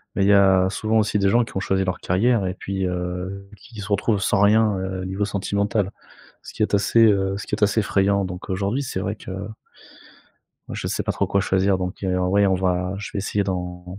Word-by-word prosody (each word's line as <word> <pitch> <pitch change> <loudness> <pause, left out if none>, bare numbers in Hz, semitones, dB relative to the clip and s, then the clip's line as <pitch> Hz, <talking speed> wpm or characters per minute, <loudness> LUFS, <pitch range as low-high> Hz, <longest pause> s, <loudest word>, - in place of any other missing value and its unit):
mais 100 - +1
il 100 - +3
y - - +6
a 95 -2 +5
souvent 110 +3 0
aussi 105 0 +1
des 100 0 +3
gens 120 +4 +4
qui - - -11
ont - - +1
choisi 95 0 0
leur 90 -1 -2
carrière 105 +3 +1
et 90 - -2
puis, 95 -1 -3
heu, 90 +2 -4
qui 110 +1 -11
se 100 - -7
retrouvent 100 +1 +1
sans 95 - +1
rien, 105 0 +4
heu, 95 0 -4
niveau 95 +2 -2
sentimental. 100 0 -1 0.5
Ce - - -11
qui - - -1
est 105 - -2
assez, 100 +3 +4
heu, 95 -2 +2
ce - - -7
qui - - -10
est 105 - -1
assez 105 +2 +3
effrayant, 100 0 +1
donc 90 0 -7
aujourd'hui, 100 +8 -1
c'est 125 -8 -4
vrai 100 +2 -3
que - - -12 1.5
je - - -4
sais - - -1
pas - - -1
trop - - -1
quoi 100 - +1
choisir 95 0 +1
donc, 90 +2 -5
heu, 90 -1 0
oui 100 +3 +3
on 95 - +2
va 90 0 0
je 105 - -6
vais - - -3
essayer 100 +1 -1
d'en 90 0 -5
100 Hz, 230 wpm, -22 LUFS, 95-105 Hz, 1.5 s, y